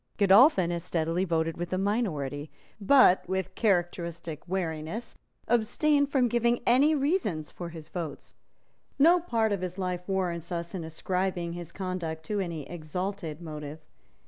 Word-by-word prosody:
Godolphin 200 - +6
as 170 -1 -2
steadily 170 +1 0
voted 165 -2 0
with 175 0 -4
the 185 - -1
minority, 160 - -1 0.3
but, 205 -3 +6
with 190 -1 -2
characteristic 170 -6 -1
wariness, 175 +4 -3 0.3
abstained 280 +5 +2
from 255 -3 +3
giving 235 0 +2
any 280 +6 +5
reasons 275 - 0
for 175 -1 -7
his 160 -2 -9
votes. 160 -5 -6 0.6
No 335 +5 +6
part 230 -10 0
of 200 -3 -1
his 185 0 -4
life 180 -2 -2
warrants 180 -3 -2
us 170 -1 -4
in 180 -3 -4
ascribing 175 +2 -2
his 175 -1 -7
conduct 175 -4 -4
to 210 +3 -2
any 165 -6 -4
exalted 175 0 -5
motive. 150 -2 -7
180 Hz, 145 wpm, -28 LUFS, 165-210 Hz, 0.6 s, Godolphin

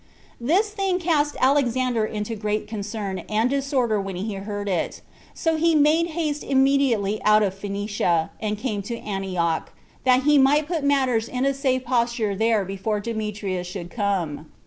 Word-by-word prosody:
This 365 - +2
thing 390 -3 0
cast 315 -4 +1
Alexander 255 -4 +2
into 210 +1 -4
great 210 0 -2
concern 205 -2 -4
and 220 +4 +1
disorder 265 -6 +1
when 195 -1 -5
he 200 +4 -3
heard 205 +1 -5
it; 180 -4 -2 0.3
so 325 -2 0
he 330 +1 +3
made 310 +3 +4
haste 300 -3 -1
immediately 265 -7 +2
out 215 0 +5
of 195 -2 0
Phoenicia, 200 -4 -1
and 210 -1 -2
came 215 -3 -2
to 235 +4 -5
Antioch, 185 -6 -2 0.3
that 255 0 +4
he 295 0 +5
might 285 +3 +4
put 330 -3 -2
matters 260 -5 +2
in 255 +1 -1
a 275 - +2
safe 260 -2 0
posture 235 -4 0
there 220 -1 +2
before 195 +3 -2
Demetrius 210 -4 -3
should 180 -1 -7
come. 185 -8 -2
225 Hz, 160 wpm, -24 LUFS, 200-275 Hz, 0.3 s, out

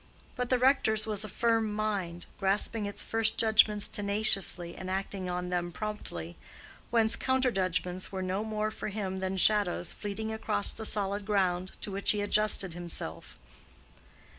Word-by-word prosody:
But 250 -2 -3
the 255 - +3
rector's 250 -4 +2
was 215 -1 +2
a 215 - -6
firm 225 +1 0
mind, 200 -5 -3
grasping 205 +2 +1
its 205 0 -1
first 225 -1 0
judgments 215 -2 +5
tenaciously 200 -4 +1
and 185 - -7
acting 190 0 -4
on 180 0 -3
them 175 -1 -2
promptly, 160 - -6 0.5
whence 225 -1 +4
counter 260 -1 +1
judgments 185 -2 -2
were 190 -1 -4
no 185 +3 -2
more 215 -1 -2
for 220 - -6
him 195 -3 -4
than 190 0 -3
shadows 190 -3 +2
fleeting 220 +2 -5
across 220 -2 +1
the 220 - -2
solid 205 0 0
ground 185 -3 -1
to 205 - -3
which 200 +2 +2
he 205 - -2
adjusted 205 -3 +3
himself. 170 - -4
205 Hz, 155 wpm, -29 LUFS, 185-215 Hz, 0.5 s, judgments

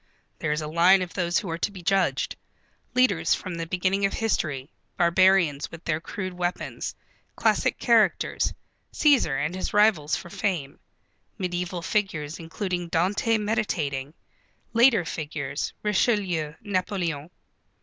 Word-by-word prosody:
There 150 - -1
is 150 +1 0
a - - -4
line 175 +4 +5
of 175 - -8
those 175 -1 0
who 200 - -2
are 165 - -3
to 205 - 0
be 185 -3 -10
judged, 195 +1 +1 0.6
leaders 255 0 +3
from 185 - -6
the 165 -1 -4
beginning 185 +3 0
of 195 - +2
history, 150 -10 -1 0.3
barbarians 175 -4 +3
with 165 +1 -11
their 155 -1 0
crude 185 0 -5
weapons, 175 0 -3 0.4
classic - - +2
characters, - - +2 0.4
Cæsar 160 - +3
and 160 - -3
his 185 +2 -4
rivals 205 -8 +4
for 175 - -8
fame; 165 -9 -2 0.6
mediæval 180 -1 -3
figures 165 -7 -1
including 175 +1 -3
Dante 195 +7 +1
meditating; 155 -10 -2 0.6
later 230 -5 +5
figures, 145 -4 -4
Richelieu, 190 -7 +1
Napoleon. 180 -6 -2
175 Hz, 130 wpm, -26 LUFS, 160-195 Hz, 0.6 s, line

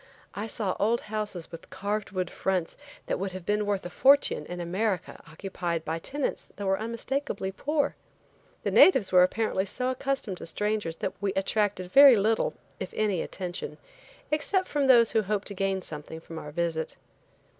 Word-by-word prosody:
I 205 +2 -4
saw 210 -4 -2
old 230 +3 +2
houses 210 -5 -4
with 165 - -10
carved 205 +2 -3
wood 185 -2 -3
fronts 185 -3 -1 0.3
that - - -2
would 190 -1 -3
have 185 -2 -7
been 210 +1 0
worth 200 -3 -1
a - - -4
fortune 270 - +4
in 175 0 -6
America 185 +2 -2
occupied 170 0 -4
by 160 +1 -2
tenants 285 - -3
that 200 - -5
were 195 0 +1
unmistakably 230 -1 -3
poor. 290 +8 0 0.7
The - - 0
natives 265 - +6
were 180 -1 +7
apparently 195 +1 +1
so 250 +6 -1
accustomed 260 -7 -2
to - - -8
strangers 210 -1 -1
that 190 - -3
we 200 -1 0
attracted 195 -2 0
very 275 -2 +9
little, 220 +2 +1 0.2
if - - -5
any 205 -5 +1
attention, 175 -5 -5 0.5
except 370 +5 +1
from 285 -2 0
those 235 -3 +6
who 220 - +3
hoped 205 0 -2
to - - -5
gain 195 -1 -1
something 155 +1 -6
from 165 0 -8
our 150 - -8
visit. 160 0 -2
200 Hz, 175 wpm, -28 LUFS, 180-225 Hz, 0.7 s, very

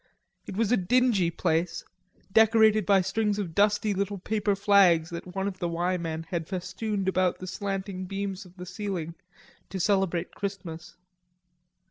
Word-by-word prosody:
It 195 - -6
was 225 -1 +1
a 245 - +5
dingy 210 -2 +2
place, 165 0 -1 0.5
decorated 220 -1 +5
by 195 -2 +5
strings 205 +2 0
of 190 -6 -3
dusty 205 +2 +2
little 200 +1 -2
paper 205 +1 0
flags 190 -5 +4
that 180 +2 -7
one 195 0 -1
of 190 -2 -5
the 175 - -1
"Y" 175 +2 0
men 165 -2 -4
had 170 -3 -2
festooned 195 +2 -3
about 185 -1 +2
the 185 - -8
slanting 195 0 -4
beams 195 0 -4
of 180 0 -18
the 180 - -7
ceiling 185 -3 -4 0.6
to 190 - -4
celebrate 185 -2 +1
Christmas. 180 -5 -6
190 Hz, 155 wpm, -27 LUFS, 180-205 Hz, 0.6 s, a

